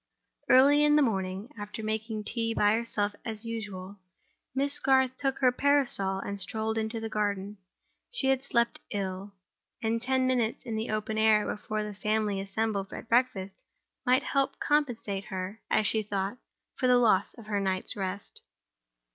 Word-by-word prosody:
Early 285 +3 +7
in 295 0 +5
the 300 - +5
morning, 195 -2 -2
after 210 +2 -6
making 220 0 -2
tea 225 +1 -1
by 205 0 +4
herself 220 -3 0
as 220 0 -4
usual, 205 -4 -6 0.6
Miss 280 +1 0
Garth 265 -1 +3
took 270 -1 -1
her 255 -2 +4
parasol 250 -8 +2
and 200 +1 -4
strolled 220 +1 -1
into 220 +1 -2
the 225 - -4
garden. 205 -2 -2 0.5
She 480 - -2
had 265 0 +2
slept 235 -3 +1
ill; 195 0 -4 0.4
and 225 +1 0
ten 260 +1 +1
minutes 245 -3 0
in 230 -3 -3
the 220 +1 -2
open 215 0 -1
air 220 -1 +5
before 215 0 -3
the 210 0 -5
family 210 -1 0
assembled 200 0 -2
at - - -8
breakfast 230 -6 +1 0.5
might 255 +1 +3
help 275 -1 +1
to - - -26
compensate 235 -9 0
her, 190 +3 -5
as 215 - +3
she 220 +2 +2
thought, 205 +2 -3 0.4
for 255 - +2
the 250 0 +6
loss 215 -5 +3
of 230 - -12
her 210 -1 -1
night's 190 -1 -1
rest. 195 0 -5
220 Hz, 165 wpm, -29 LUFS, 200-250 Hz, 0.6 s, Early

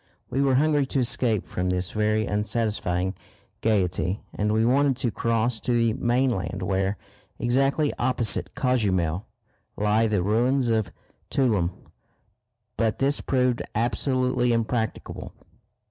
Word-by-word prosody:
We 135 - +1
were 135 -2 +3
hungry 145 0 +3
to 135 - -1
escape 115 -4 0
from 90 0 -2
this 90 0 -1
very 110 0 +1
unsatisfying 105 -4 -1 0.5
gaiety, 95 -3 0
and 105 +1 0
we 110 +1 +2
wanted 135 +1 +3
to 120 -3 0
cross 115 +1 0
to 125 - -1
the 115 -2 +2
mainland 120 -5 0
where, 95 +1 0 0.4
exactly 135 +4 +1
opposite 120 -4 -1
Cozumel, 95 -9 0 0.5
lie 105 +2 +2
the 105 -4 +1
ruins 120 +5 +2
of 110 -4 +1 0.4
Tuloom. 110 -11 +2 1.1
But 110 -2 +1
this 140 +2 +1
proved 125 -2 +1
absolutely 125 +1 +1
impracticable. 115 0 -2
115 Hz, 120 wpm, -25 LUFS, 105-125 Hz, 1.1 s, were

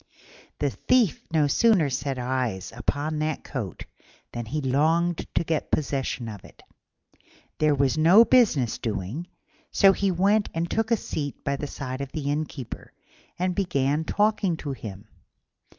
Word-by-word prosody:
The - - 0
Thief 245 - +2
no 155 -2 +3
sooner 170 - +3
set 135 +1 -2
eyes 125 -6 -2
upon 145 +5 -2
the 155 -1 -1
coat - - -5 0.5
than 120 -1 -5
he 150 +7 -2
longed 160 +5 +1
to - - +2
get 160 -2 -2
possession 135 -4 -1
of 105 -3 -8
it. - - -17 1.0
There 155 -1 +3
was 140 +1 +1
no 185 +9 +7
business 205 - +3
doing, 110 - -4 0.4
so 195 -1 +5
he 200 0 0
went 200 +4 +2
and 165 +1 0
took 225 0 0
a 230 - +3
seat 145 -7 -5
by 140 -1 0
the 145 +1 -4
side 130 -1 -5
of 140 -1 -6
the 145 -3 -2
Innkeeper, 145 -4 -5 0.4
and 180 +1 0
began 150 -6 0
talking 205 -2 +1
to 145 -3 -5
him. 105 -5 -8
150 Hz, 150 wpm, -25 LUFS, 130-175 Hz, 1.0 s, no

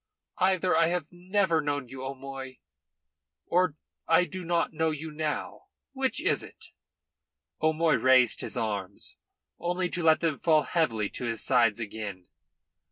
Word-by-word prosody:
Either 185 -1 +3
I 165 0 +4
have 170 -3 -2
never 180 -1 +1
known 145 -3 -2
you, 130 +1 -8
O'Moy, 135 -1 -7 0.9
or 180 -3 +2 0.3
I 165 +2 +5
do 180 +3 -7
not 170 0 0
know 160 0 +1
you 155 +1 -5
now. 150 0 -4 0.2
Which 265 -1 -1
is - - +2
it?" - - -10 0.9
O'Moy 160 +1 +3
raised 130 -2 +4
his - - -4
arms, 100 -4 -3 0.4
only 180 +1 -1
to 180 - -2
let 160 -1 +5
them 165 -4 0
fall 155 -3 +4
heavily 115 - 0
to 125 - -5
his 115 -1 -2
sides 115 -4 +3
again. 100 -4 -6
155 Hz, 145 wpm, -28 LUFS, 130-170 Hz, 0.9 s, I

